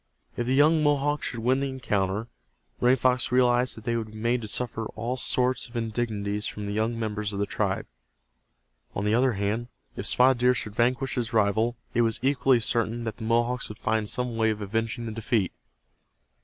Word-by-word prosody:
If 120 - -2
the 130 - +2
young 155 +3 +5
Mohawk 145 0 +1
should 115 - -3
win 130 +3 +2
the 140 0 -1
encounter, 105 -5 -1 0.5
Running 125 +2 +4
Fox 125 0 +1
realized 125 -1 +3
that 110 - -10
they 120 0 -1
would 115 -2 -2
be - - -9
made 120 +2 0
to 110 - -5
suffer 115 0 -1
all 115 +3 -2
sorts 125 0 +1
of 120 - -16
indignities 110 -3 -2
from 105 - -6
the 100 - -3
younger 110 +3 -1
members 105 -2 -3
of - - -4
the 100 - +1
tribe. - - -2 1.1
On 100 - -2
the 105 - +2
other 125 +2 +3
hand, 105 +4 -2 0.3
if - - +2
Spotted 125 0 +4
Deer 125 +1 +4
should 105 -3 -4
vanquish 125 +4 +1
his 120 -3 -3
rival 110 +2 +2 0.2
it 120 - +3
was 115 -1 +1
equally 135 -2 +3
certain 115 +1 0
that 110 -1 -4
the 110 - -6
Mohawks 120 +2 0
would 105 - -8
find 110 -2 -1
some 125 -2 -2
way 110 0 +3
of 110 -1 -2
avenging 115 +3 -2
the 110 - -4
defeat. 110 -3 0
115 Hz, 200 wpm, -26 LUFS, 110-125 Hz, 1.1 s, young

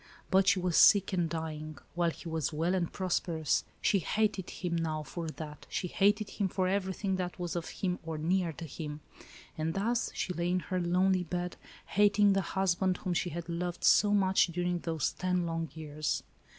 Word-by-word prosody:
But 190 0 +4
she 190 - +5
was 180 -2 +1
sick 200 -2 +6
and 175 -3 +1
dying, 155 -2 -5 0.2
while 175 -1 +2
he 165 - -8
was 160 -2 -1
well 165 +4 0
and 180 -3 0
prosperous. 170 -4 0 0.2
She 205 -2 +4
hated 205 +1 0
him 175 -2 -3
now 160 -2 -1
for 165 +2 -5
that; 155 -1 -8
she 180 - -2
hated 205 +2 +2
him 200 - 0
for 185 0 0
everything 190 0 -1
that 180 -1 -3
was 175 -1 -4
of 170 -2 -3
him 180 -2 -2
or 160 -1 -5
near 175 +2 +1
to 165 - -7
him. 150 0 -6 0.6
And 160 +1 -1
thus' 230 +5 0
she 180 - -2
lay 170 0 -1
in 180 0 +1
her 185 0 -2
lonely 180 +1 +2
bed, 175 +1 -3 0.3
hating 205 0 +4
the 195 - +2
husband, 190 0 +1
whom 180 - -2
she 175 - 0
had 170 0 -6
loved 175 +1 -3
so 205 0 +5
much 190 -2 +4
during 175 +1 -1
those 160 -4 -1
ten 180 -1 -1
long 165 -1 -2
years. 155 -1 -2
175 Hz, 190 wpm, -31 LUFS, 165-190 Hz, 0.6 s, sick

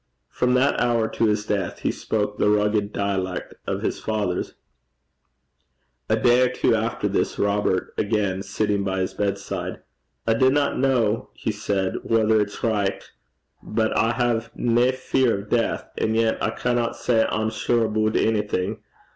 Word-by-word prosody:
From 125 0 +1
that 135 +3 +2
hour 120 -2 +2
to 115 - 0
his 105 0 0
death 105 -2 -2
he - - +1
spoke 105 -1 -2
the - - +3
rugged 105 0 +1
dialect 95 -3 -2
of - - -2
his - - -1
fathers. 105 -5 -2 1.5
A - - +4
day 120 +1 +4
or 125 - +4
two 125 - +1
after 115 0 -1
this, 100 - -1
Robert 100 -2 0
again 100 -3 0
sitting 105 0 -1
by 95 -1 -1
his 95 - -2
bedside, 100 -2 -3 0.4
'I 115 - +3
dinna 130 +5 +3
ken,' 120 -4 +1
he - - -2
said, 100 -2 -1
'whether 110 -1 +3
it's 100 +4 -5
richt 105 -4 -1 0.5
but 110 0 -1
I 115 +1 +2
hae 115 -1 0
nae 120 +1 +2
fear 130 -2 +1
o' - - -5
deith, 115 +3 0 0.2
an' 110 0 +1
yet 115 0 +1
I - - +2
canna 120 +1 -1
say 115 -2 +2
I'm 110 +1 -1
sure 115 +1 +1
aboot 110 0 +1
onything. 105 -4 0
110 Hz, 155 wpm, -23 LUFS, 100-115 Hz, 1.5 s, A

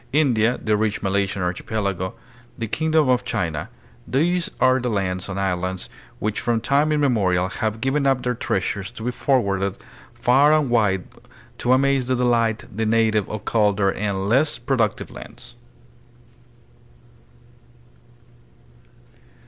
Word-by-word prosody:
India, 125 -6 +3
the 110 -1 +1
rich 105 -1 -1
Malaysian 100 -1 0
archipelago, 95 0 -2 0.4
the 115 - -3
kingdom 155 +4 +1
of 125 -1 +2
China, 85 -9 -3 0.4
these 170 +6 +1
are 130 +1 +4
the 125 0 -2
lands 95 -3 -2
and 100 0 -3
islands 95 -1 -2 0.3
which 110 0 -2
from 120 -2 0
tune 140 +6 +2
imme 145 -4 +2
morial 95 -3 +1
have 110 -1 -1
given 140 +1 +1
up 135 -2 +2
their 125 - 0
treasures 95 -3 -2
to 115 -1 -10
be 125 - -1
forwarded 100 -8 0 0.4
far 140 +5 +4
and 145 -5 -1
wide 105 -6 +2 0.6
to 120 - +1
amaze 135 -1 +2
and 130 - +2
delight 115 -3 +1
the 110 0 -1
native 110 -2 +2
of 110 -1 -6
colder 105 -3 +2
and 100 -1 -2
less 135 +8 +2
productive 115 -6 -1
lands. - - -11
110 Hz, 130 wpm, -22 LUFS, 100-130 Hz, 0.6 s, are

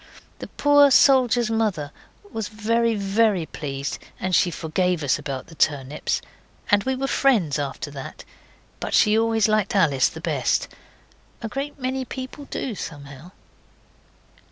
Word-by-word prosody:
The - - -7
poor 290 0 +5
soldier's 250 -4 +4
mother 200 -10 -1 0.4
was 220 -2 -3
very, 230 +1 0
very 200 -2 +1
pleased, 140 -3 -5 0.2
and 185 0 -2
she 175 - +4
forgave 170 +1 -1
us 140 +1 +1
about 135 -3 -5
the 165 - -15
turnips, 145 -2 -1 0.5
and 205 -1 +4
we 265 0 0
were 270 +1 -2
friends 215 - +2
after 145 +1 -4
that, 135 -2 -9 0.6
but - - -2
she 210 0 +4
always 225 -1 +2
liked 215 -2 +1
Alice 145 -9 +3
the - - -10
best. - - 0 0.8
A - - -2
great 275 +6 -5
many 260 +1 -2
people 260 +3 -7
do, 265 -3 -4
somehow. 145 -3 -9
205 Hz, 140 wpm, -23 LUFS, 150-235 Hz, 0.8 s, poor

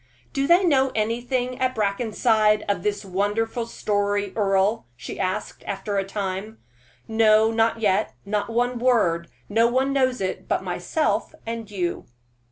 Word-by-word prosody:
"Do 275 -2 0
they 345 +4 +5
know 270 -6 +3
anything 245 +3 -1
at 255 0 0
Brackenside 215 0 +2
of 200 -3 0
this 205 +1 -2
wonderful 210 +5 -1
story, 205 -3 -1
Earle?" 200 - +1
she 120 - -8
asked, 190 +2 -3
after 205 -1 -2
a - - 0
time. 195 +2 -4 0.5
"No, 220 0 +4
not 225 0 +1
yet 205 0 +1
not 205 +2 -1
one 245 +1 0
word; 210 -10 +2 0.2
no 225 +3 +3
one 260 +3 +1
knows 260 -2 +2
it 190 -1 -3
but - - 0
myself - - -1
and 230 -1 -5
you." 180 -4 -3
215 Hz, 145 wpm, -24 LUFS, 200-240 Hz, 0.5 s, they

